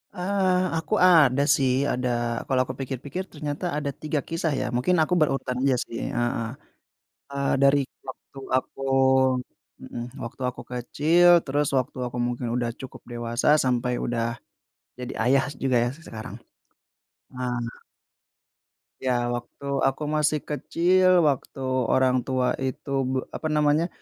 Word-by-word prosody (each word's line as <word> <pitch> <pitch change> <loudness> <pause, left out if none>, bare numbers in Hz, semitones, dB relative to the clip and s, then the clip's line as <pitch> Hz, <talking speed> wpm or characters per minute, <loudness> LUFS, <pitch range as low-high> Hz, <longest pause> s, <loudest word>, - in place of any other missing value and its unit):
Eee, 185 0 +1
aku 160 -1 -3
ada 145 -7 +6
sih, 130 -2 +2 0.2
ada. 125 0 -1 0.4
Kalau 130 -1 +2
aku 130 - -5
pikir-pikir, 140 +7 -4
ternyata 150 +2 -4
ada 145 -1 -2
3 150 -1 -1
kisah, 165 0 -1
ya. - - -1
Mungkin 155 +9 +2
aku 180 - -1
berurutan 135 -3 0
aja 135 -1 +3
sih 115 - -7 0.2
heeh. 120 -1 0 0.8
Eee, 140 0 -1
dari 140 +1 +6 0.3
waktu 130 +1 -10 0.2
aku 130 - -5 1.0
mhm, 120 - -6 0.2
waktu 120 +3 -8
aku - - -9
kecil, 150 +8 +3 0.2
terus 145 +1 0
waktu 130 +1 -2
aku 120 0 -7
mungkin 120 0 -3
udah 120 -1 0
cukup 130 - -9
dewasa, 120 +1 -2 0.2
sampai 125 -1 0
udah 120 -1 -1 0.8
jadi 125 -1 -5
ayah 135 +3 +3 0.2
juga, 130 -2 +2
ya, - - 0
se - - -18
sekarang. 110 -1 -7 1.0
Eh 125 -2 -3 1.2
Ya, 120 -2 0
waktu 120 +3 -6 0.2
aku 135 +3 -2
masih 150 0 +1
kecil, 180 +4 +3
waktu 140 -2 -1 0.2
orang 130 +1 +3
tua 130 -1 +1
itu 135 +1 -4 0.2
b 130 - -2 0.2
apa 155 - -4
namanya, 150 +2 +2
135 Hz, 135 wpm, -25 LUFS, 125-150 Hz, 1.2 s, ada